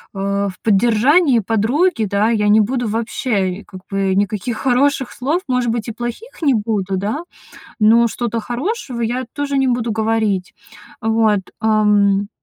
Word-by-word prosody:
э, 200 +1 -1
в - - -8
поддержании 240 - +3
подруги, 225 - +1
да, 200 +2 +1
я 210 -3 +1
не 215 +1 +6
буду 240 +2 -1
вообще, 220 -3 -1
и - - -16
как 185 -2 -11
бы 195 -1 0
никаких 205 +3 -1
хороших 265 +1 +1
слов, 295 +8 -1
может 250 -2 +1
быть, 230 0 -3
и - - -5
плохих 240 - -7
не 285 -4 +3
буду, 205 -3 -1
да, 210 - -2 0.6
но 230 +2 +5
что-то 230 0 -3
хорошего 250 - -4
я 245 +3 -1
тоже 285 -1 -2
не 265 -1 +2
буду 240 -2 0
говорить. 220 -4 0 0.5
Вот. 220 -2 +2 0.2
Эм. 205 -2 +3
225 Hz, 155 wpm, -18 LUFS, 205-250 Hz, 0.6 s, не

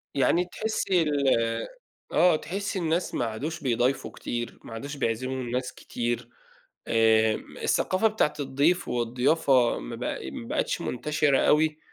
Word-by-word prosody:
يعني 165 +7 +3
تحسي 190 -2 0
ال 145 -3 +1 0.8
آه، 180 -2 +5
تحسي 190 +5 -3
الناس 170 +1 0
ما 120 - 0
عادوش 140 +9 -4
بيضايفوا 125 +1 0
كتير، 120 0 -5
ما 115 - -9
عادوش 140 +5 -6
بيعزموا 130 +1 -2
الناس 125 +1 -3
كتير، 120 0 -3 0.6
آآ، 110 -1 +4 0.3
الثقافة 190 +4 +2
بتاعة 215 -9 +1
الضيف 145 +6 +1
والضيافة 125 +2 +2
ما - - -6
بق - - -3
ما 115 - -7
بقتش - - -1
منتشرة 145 +2 +1
أوي، 155 0 +3
140 Hz, 130 wpm, -27 LUFS, 120-160 Hz, 0.8 s, آه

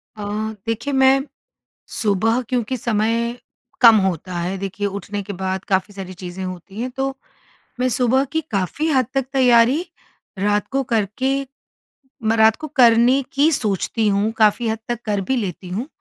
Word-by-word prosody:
अ, 210 - -9 0.5
देखिए 235 +5 -2
मैं 265 0 +5 0.7
सुबह, 225 +3 +1
क्योंकि 250 0 -1
समय 230 +2 0 0.4
कम 230 -2 +9
होता 185 -1 -2
है, 180 +3 -2
देखिए 195 +1 -3
उठने 200 +1 -5
के 200 - -6
बाद 190 0 -3
काफ़ी 195 +1 0
सारी 190 -1 -7
चीज़ें 185 +1 -7
होती 185 +3 -7
हैं, 255 - -2
तो 270 +1 -3 0.6
मैं 255 - +2
सुबह 255 +2 +2
की 320 0 0
काफ़ी 200 - -1
हद 260 -5 +3
तक 270 -2 0
तैयारी 255 +5 +4 0.5
रात 205 +1 +1
को 270 0 0
करके 235 +3 0 0.9
मैं 220 +1 +2
रात 220 0 +5
को 310 - -7
करने 250 -1 +5
की 290 +4 +3
सोचती 220 - 0
हूँ, 205 +2 +1
काफ़ी 220 +2 +3
हद 220 0 -1
तक 240 -1 -3
कर 205 -2 0
भी 260 +8 -1
लेती 185 -3 -4
हूँ। 220 +10 -3
225 Hz, 160 wpm, -20 LUFS, 200-255 Hz, 0.9 s, कम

